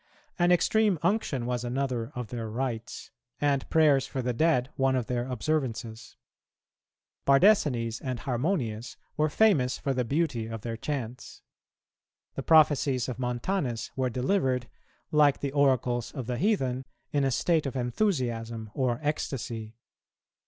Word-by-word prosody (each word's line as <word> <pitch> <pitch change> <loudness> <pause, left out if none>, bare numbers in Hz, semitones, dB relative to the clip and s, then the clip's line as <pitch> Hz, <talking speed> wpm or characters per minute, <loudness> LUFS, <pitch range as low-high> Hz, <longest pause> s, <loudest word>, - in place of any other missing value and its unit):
An 175 0 +4
extreme 205 +2 +3
unction 170 - 0
was 125 0 -2
another 125 -1 -2
of 125 -4 -5
their 115 -3 -4
rites, 115 -1 -4 0.3
and 140 -2 0
prayers 145 -4 +4
for 130 -2 -4
the 125 0 0
dead 135 -1 +2
one 135 0 +2
of 125 -3 0
their 120 +1 -2
observances. 120 -4 -3 1.1
Bardesanes 135 - +3
and 130 -2 -3
Harmonius 125 - -2 0.2
were 155 0 +2
famous 145 -9 +3
for 140 - -1
the 125 -1 0
beauty 135 -3 -1
of 115 -1 -6
their 115 +1 -4
chants. 125 -1 -5 0.9
The - - -4
prophecies 145 -5 +4
of 125 - -5
Montanus 125 - -2
were 130 -1 0
delivered, 130 - 0 0.4
like 150 -2 +4
the 140 - -2
oracles 130 -4 +1
of 130 -5 -5
the 125 0 -3
heathen, 135 - +1 0.3
in 145 -1 +1
a 135 - +2
state 155 +4 +1
of 135 - -5
enthusiasm 120 - -1
or 125 -3 0
ecstasy. 115 -7 -3
130 Hz, 140 wpm, -28 LUFS, 120-150 Hz, 1.1 s, An